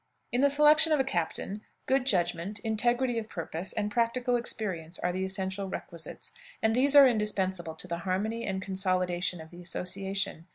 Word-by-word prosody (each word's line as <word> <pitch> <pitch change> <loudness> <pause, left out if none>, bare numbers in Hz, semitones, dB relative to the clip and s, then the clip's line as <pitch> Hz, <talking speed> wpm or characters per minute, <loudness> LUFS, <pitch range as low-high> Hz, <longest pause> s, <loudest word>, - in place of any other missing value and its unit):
In 245 - +1
the 280 - +5
selection 300 +3 +6
of 305 - +4
a - - +4
captain, 195 -1 -2 0.2
good 265 -1 +1
judgment, 175 -1 0
integrity 240 +3 +1
of 220 -1 -8
purpose, 165 +1 -5
and 210 -1 -2
practical 245 +2 +1
experience 185 -8 -3
are 180 0 -1
the 185 +1 -2
essential 190 0 -1
requisites, 170 -3 -6 0.3
and 220 0 +2
these 275 +3 +3
are 280 -2 +10
indispensable 190 -7 0
to 170 - -8
the 170 -1 -3
harmony 205 +6 -2
and 190 -1 -3
consolidation 185 -2 0
of 160 0 -11
the 175 0 -11
association. 190 -1 -4
195 Hz, 170 wpm, -29 LUFS, 180-240 Hz, 0.3 s, are